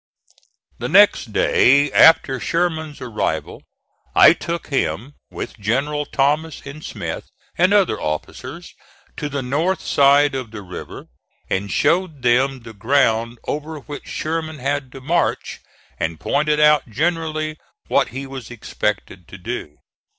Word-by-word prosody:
The - - -3
next - - +5
day 140 +3 +4
after 135 -5 +5
Sherman's 160 -1 -2
arrival 120 -4 -3 0.5
I - - +8
took 170 0 -5
him, 120 - -2 0.2
with - - -7
Generals 140 +8 -1
Thomas 150 +3 0
and 145 +2 -9
Smith - - -5 0.3
and 180 +3 +3
other 195 - +3
officers, 75 0 -5 0.4
to 150 - -3
the 140 -1 -3
north 160 +9 0
side 140 +1 +4
of 130 -4 -4
the 105 -2 -9
river, 90 -1 -9 0.5
and 100 +1 -1
showed 165 -6 +1
them 130 +2 +2
the 115 -1 -11
ground 115 +1 +1
over 150 +1 -4
which 145 +1 -9
Sherman 160 0 -3
had 140 0 -2
to 135 - -10
march, 165 +6 -1 0.4
and 80 -1 -2
pointed 150 - +1
out 150 -4 +4
generally 155 +3 -2 0.3
what - - +2
he 135 +4 -6
was 135 -2 -8
expected 105 -5 -4
to 95 - -11
do. 90 -7 -6
140 Hz, 135 wpm, -20 LUFS, 120-155 Hz, 0.5 s, I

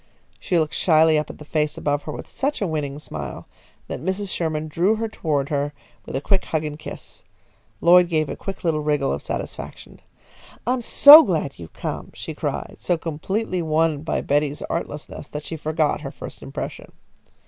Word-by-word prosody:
She 180 - 0
looked 155 -2 +1
shyly 160 -2 +4
up 150 - -4
at - - -9
the 150 - -11
face 150 0 -1
above 145 0 0
her 150 - -4
with - - -7
such 280 +2 -2
a 200 - 0
winning 150 -4 -2
smile 80 - -7 0.4
that - - -5
Mrs. 190 +6 -2
Sherman 155 -2 -2
drew 175 +8 +2
her 225 +1 -2
toward 150 -9 -1
her 145 -1 -1 0.3
with - - -5
a 135 - -1
quick 195 +5 +1
hug 155 -1 -1
and 150 0 -5
kiss. - - -8 0.6
Lloyd 175 0 +6
gave 155 -3 +1
a - - -4 0.3
little 160 -3 +1
wriggle 150 -2 +1
of - - -4
satisfaction. - - -6 0.7
"I'm 250 +1 +1
so 290 +6 +10
glad 160 - -2
you've 85 -1 -10
come!" - - -5
she - - -6
cried, - - -4
so 175 - +1
completely 180 +5 -2
won 160 -2 +1
by 160 - -1
Betty's 145 0 0
artlessness 150 -3 -5
that 150 0 -6
she 165 - -4
forgot 155 0 0
her - - -5
first - - -10
impression. 70 0 -7
155 Hz, 180 wpm, -23 LUFS, 150-175 Hz, 0.7 s, so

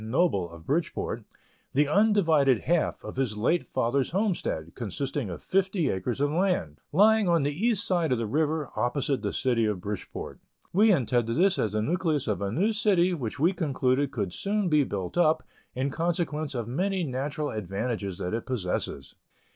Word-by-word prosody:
Noble, 110 - +1
of 85 -1 -13
Bridgeport, 160 +4 -2 0.5
the 145 +2 +3
undivided 160 - +3
half 170 0 0
of - - -8
his 125 -6 -1
late 160 +11 +1
father's 130 +1 0
homestead, 175 - -1
consisting 130 +2 -3
of 85 - -7
fifty 190 -5 +1
acres 115 +7 -3
of 145 +1 +1
land; 165 - 0
lying 210 +3 +5
on 170 -4 +3
the 145 +1 0
east 210 +5 0
side 175 -5 +1
of 125 - +3
the 115 - -1
river, 150 +4 0
opposite 135 +2 0
the - - -2
City 120 -4 +1
of 105 -3 -1
Bridgeport. 100 +2 -6 0.3
We 210 +4 +5
intended 120 - +1
this 190 +2 +3
as 105 -2 0
the 105 0 0
nucleus 155 -1 0
of 105 -2 -1
a 100 -1 -1
new 200 - +1
city, 190 -4 +3
which 130 -8 -4
we 170 +6 +3
concluded 140 -5 +1
could 100 -10 -3
soon 205 -1 -1
be 150 -2 +4
built 100 - -3
up, 160 -2 +3 0.3
in 135 +2 -1
consequence 160 -3 -1
of 120 -3 -3
many 185 +9 -1
natural 145 +2 -3
advantages 100 -1 -3
that 90 - -3
it 115 - -3
possesses. 90 - -3
140 Hz, 175 wpm, -27 LUFS, 115-175 Hz, 0.5 s, lying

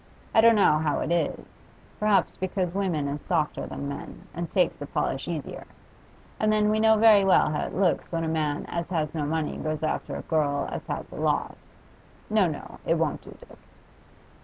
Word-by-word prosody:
I 220 - +6
don't 230 0 +6
know 155 -7 +4
how 155 -2 0
it - - -2
is; 170 -1 0 0.5
perhaps 210 -1 +2
because 185 -2 -2
women 180 -7 -1
is 145 +1 -4
softer 160 -5 -1
than 140 - -5
men, 140 - -7
and 170 0 -4
takes 180 -3 +2
the 145 - -8
polish 135 -1 -2
easier. 160 -5 -5 0.7
And 215 0 +2
then 210 0 +3
we 215 - +1
know 220 0 +5
very 215 -2 +6
well 190 -5 +4
how 150 - -1
it - - -8
looks 185 -2 +1
when 165 -1 -1
a - - -1
man 155 -2 -1
as 170 0 -4
has 155 -4 -1
no 150 -3 -2
money 160 0 -2
goes 155 0 -3
after 155 - -2
a - - -5
girl 145 -3 0
as - - -6
has - - -5
a - - -9
lot. - - 0 0.8
No, 210 -4 +4
no; 155 - -7
it 165 - +2
won't 160 -2 -1
do, - - -13
Dick. - - -17
165 Hz, 200 wpm, -26 LUFS, 150-195 Hz, 0.8 s, I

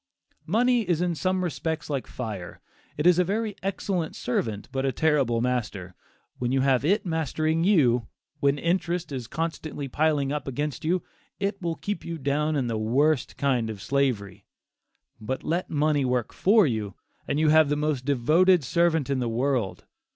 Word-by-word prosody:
Money 240 +6 +3
is 170 -3 +2
in 175 -1 0
some 185 +3 0
respects 160 -2 -3
like 140 -3 -3
fire 105 -8 -6 0.4
it 150 - -1
is 180 0 +6
a - - +5
very 210 +3 -2
excellent 190 -3 -2
servant 110 -4 -2
but 135 0 -2
a 135 - +1
terrible 135 -5 +1
master. 105 -7 -2 0.5
When 125 0 -1
you 135 0 +2
have 135 -1 +2
it 200 +8 +2
mastering 160 0 0
you, 125 - +3 0.3
when 140 0 +2
interest 170 +1 -1
is 125 -4 -5
constantly 160 -2 -4
piling 145 0 +1
up 150 -1 -3
against 145 +2 -3
you, 175 +3 0 0.4
it 200 0 -2
will 170 -2 -2
keep 205 -1 -4
you 170 -1 -5
down 150 +2 0
in 135 -3 0
the 115 -2 -2
worst 135 +7 +1
kind 125 -5 +1
of 110 -2 -6
slavery. 120 -7 -1 0.7
But 110 +5 -4
let 170 +3 -1
money 150 -2 +1
work 125 -2 -1
for 210 +1 +4
you, 110 -7 -2 0.3
and 145 - 0
you 155 -1 +3
have 155 -1 +5
the 145 - +2
most 150 -3 -1
devoted 155 +7 +3
servant 160 +2 +2
in 140 -2 0
the 120 -2 -1
world. 120 -3 -1
150 Hz, 175 wpm, -26 LUFS, 125-170 Hz, 0.7 s, is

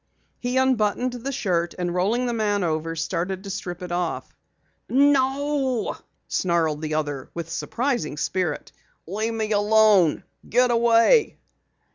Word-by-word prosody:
He 250 +1 -2
unbuttoned 250 -1 +1
the 250 +3 -4
shirt, 175 -8 -1
and 175 -1 -2
rolling 210 +8 +1
the 240 - -1
man 205 -3 0
over, 165 0 -2
started 180 +3 -3
to 200 - -6
strip 175 -1 -5
it 180 - -6
off. 175 -1 -3 0.5
"No!" 275 -1 +1 0.3
snarled 165 -4 0
the 155 -1 -2
other 145 -4 -3
with 165 -1 -5
surprising 240 - -2
spirit. 180 +2 -2 0.3
"Leave 215 +6 -3
me 220 -1 -2
alone! 205 -5 +4 0.3
Get 250 +1 +3
away!" 235 - +4
205 Hz, 130 wpm, -24 LUFS, 170-245 Hz, 0.5 s, alone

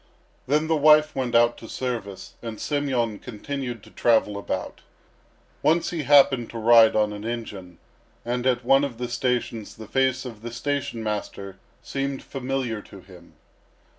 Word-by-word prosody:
Then 150 +3 +2
the 160 0 +1
wife 150 0 +5
went 125 -3 -1
out 120 0 +4
to 115 - -11
service, 115 -7 -5
and 115 -2 -6
Semyon 130 -7 -1
continued 125 -1 -6
to - - -16
travel 110 -3 +2
about. 100 - -4 0.8
Once 165 +2 +2
he 170 -3 -2
happened 135 -4 +5
to 115 - -7
ride 115 0 +6
on 105 -1 +2
an 105 0 -7
engine, 105 -6 -6 0.5
and 125 +1 -1
at 125 -1 +1
one 135 +2 +5
of 130 -5 -3
the 125 0 -3
stations 120 -3 -2
the 110 - -10
face 130 +2 0
of 115 -4 -8
the 120 +1 -6
station 120 -2 -3
master 100 -2 -5 0.2
seemed 135 0 -3
familiar 130 -4 -3
to 100 -1 -14
him. 90 -2 -16
120 Hz, 160 wpm, -24 LUFS, 110-135 Hz, 0.8 s, ride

